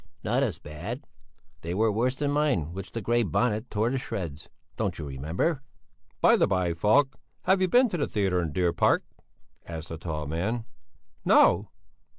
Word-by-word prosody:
"Not -, -, +1 dB
as -, -, 0 dB
bad? 90 Hz, -, -7 dB, 0.6 s
They 85 Hz, +2 st, -4 dB
were 110 Hz, +2 st, +3 dB
worse 120 Hz, +5 st, +1 dB
than 145 Hz, +1 st, -1 dB
mine 140 Hz, -, +1 dB
which 95 Hz, +1 st, -7 dB
the 115 Hz, -, -3 dB
Grey 120 Hz, +3 st, +2 dB
Bonnet 110 Hz, +3 st, 0 dB
tore 110 Hz, +3 st, 0 dB
to 135 Hz, -, 0 dB
shreds. 85 Hz, -, -5 dB, 0.3 s
Don't -, -, -2 dB
you 75 Hz, -, -5 dB
remember?" 80 Hz, -, -1 dB, 0.6 s
"By -, -, +6 dB
the -, -, +3 dB
by, 90 Hz, -3 st, +1 dB
Falk, 130 Hz, -, +2 dB, 0.2 s
have 190 Hz, 0 st, +3 dB
you 185 Hz, -, +4 dB
been 250 Hz, +8 st, +5 dB
to 180 Hz, -, -2 dB
the 145 Hz, -, 0 dB
theatre 95 Hz, -4 st, +1 dB
in 85 Hz, -, -1 dB
the 75 Hz, -, -7 dB
Deer 90 Hz, -2 st, +2 dB
Park?" -, -, +3 dB, 0.6 s
asked 80 Hz, -1 st, -7 dB
the 80 Hz, -, -6 dB
tall 80 Hz, -3 st, -4 dB
man. 100 Hz, +10 st, -2 dB, 0.6 s
"No!" -, -, +5 dB
100 Hz, 180 wpm, -27 LUFS, 85-125 Hz, 0.6 s, By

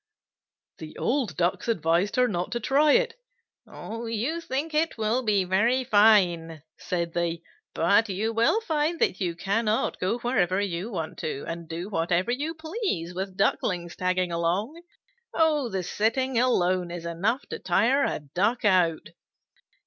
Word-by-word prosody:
The 155 Hz, -1 st, -9 dB
old 240 Hz, -, -1 dB
Ducks 175 Hz, +5 st, 0 dB
advised 175 Hz, 0 st, +1 dB
her 250 Hz, 0 st, +4 dB
not 180 Hz, -5 st, -3 dB
to 240 Hz, -, -1 dB
try 285 Hz, +6 st, +3 dB
it. 485 Hz, -1 st, +2 dB, 0.5 s
"You 230 Hz, +8 st, -4 dB
think 300 Hz, +2 st, -3 dB
it 315 Hz, -1 st, 0 dB
will 220 Hz, +3 st, 0 dB
be 210 Hz, -5 st, +2 dB
very 225 Hz, +8 st, +2 dB
fine," 180 Hz, -, +3 dB, 0.2 s
said 170 Hz, -2 st, -3 dB
they, 170 Hz, -1 st, -2 dB, 0.3 s
"but 200 Hz, +6 st, +3 dB
you 210 Hz, +4 st, -1 dB
will 235 Hz, -, +2 dB
find 320 Hz, -3 st, -1 dB
that 190 Hz, -, 0 dB
you 175 Hz, -3 st, -1 dB
cannot 215 Hz, +5 st, 0 dB
go 190 Hz, +6 st, 0 dB
wherever 200 Hz, -7 st, +1 dB
you 195 Hz, +1 st, -3 dB
want 165 Hz, -5 st, -5 dB
to, 140 Hz, -3 st, -4 dB
and 165 Hz, 0 st, -6 dB
do 170 Hz, +3 st, -5 dB
whatever 175 Hz, +2 st, 0 dB
you 295 Hz, +6 st, -2 dB
please 315 Hz, -, -3 dB
with 190 Hz, +1 st, -5 dB
Ducklings 175 Hz, -3 st, 0 dB
tagging 185 Hz, -1 st, 0 dB
along. 185 Hz, -, -1 dB, 0.5 s
The 290 Hz, -, +1 dB
sitting 230 Hz, +6 st, 0 dB
alone 185 Hz, -7 st, +1 dB
is 170 Hz, -1 st, -7 dB
enough 200 Hz, +11 st, -1 dB
to -, -, -5 dB
tire 230 Hz, +10 st, +2 dB
a -, -, -1 dB
Duck 205 Hz, -, -1 dB
out." 180 Hz, -5 st, +2 dB
205 Hz, 150 wpm, -26 LUFS, 175-250 Hz, 0.5 s, her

